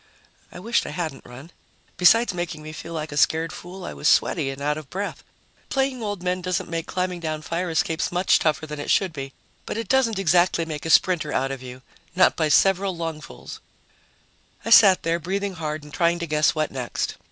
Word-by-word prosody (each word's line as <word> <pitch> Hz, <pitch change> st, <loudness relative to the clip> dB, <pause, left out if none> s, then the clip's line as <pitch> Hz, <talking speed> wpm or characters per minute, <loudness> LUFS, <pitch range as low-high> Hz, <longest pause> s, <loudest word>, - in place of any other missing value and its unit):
I -, -, -10 dB
wished 230 Hz, +5 st, 0 dB
I -, -, -4 dB
hadn't 155 Hz, -2 st, -5 dB
run. 135 Hz, +7 st, -12 dB, 0.5 s
Besides 225 Hz, +4 st, +5 dB
making 175 Hz, -3 st, -5 dB
me 155 Hz, 0 st, -8 dB
feel 165 Hz, +1 st, -8 dB
like 155 Hz, -1 st, -4 dB
a 145 Hz, -, -5 dB
scared 160 Hz, +2 st, +2 dB
fool, 180 Hz, +1 st, -9 dB
I -, -, -6 dB
was 150 Hz, -, -2 dB
sweaty 150 Hz, -6 st, +2 dB
and 135 Hz, 0 st, -6 dB
out 145 Hz, +1 st, 0 dB
of 155 Hz, -3 st, -9 dB
breath. 200 Hz, +2 st, -5 dB, 0.5 s
Playing 270 Hz, -2 st, -1 dB
old 205 Hz, -4 st, -4 dB
men 180 Hz, 0 st, -1 dB
doesn't 180 Hz, -1 st, -2 dB
make 165 Hz, 0 st, -3 dB
climbing 180 Hz, -1 st, -2 dB
down 155 Hz, -2 st, -4 dB
fire 175 Hz, +3 st, -2 dB
escapes 160 Hz, 0 st, 0 dB
much 180 Hz, +1 st, +3 dB
tougher 155 Hz, 0 st, 0 dB
than 150 Hz, -1 st, -7 dB
it 145 Hz, -, -5 dB
should 190 Hz, -4 st, +2 dB
be, 135 Hz, -2 st, -6 dB, 0.4 s
but -, -, -4 dB
it 225 Hz, -2 st, -4 dB
doesn't 250 Hz, -4 st, +2 dB
exactly 175 Hz, -2 st, +2 dB
make 155 Hz, 0 st, -5 dB
a -, -, -3 dB
sprinter 160 Hz, -3 st, +3 dB
out 135 Hz, -1 st, 0 dB
of 135 Hz, -2 st, -6 dB
you 130 Hz, 0 st, -10 dB, 0.3 s
not 185 Hz, -, +4 dB
by 155 Hz, -2 st, 0 dB
several 195 Hz, +3 st, +3 dB
lungfuls. 165 Hz, -1 st, -7 dB, 1.1 s
I 230 Hz, -, -3 dB
sat 195 Hz, -5 st, +7 dB
there, 165 Hz, +1 st, 0 dB
breathing 195 Hz, +4 st, -3 dB
hard 155 Hz, -3 st, -4 dB
and 150 Hz, -1 st, -13 dB
trying 170 Hz, 0 st, +2 dB
to 170 Hz, -, -4 dB
guess 150 Hz, 0 st, +2 dB
what 155 Hz, -1 st, -1 dB
next. 125 Hz, -3 st, -3 dB
165 Hz, 210 wpm, -23 LUFS, 155-185 Hz, 1.1 s, sat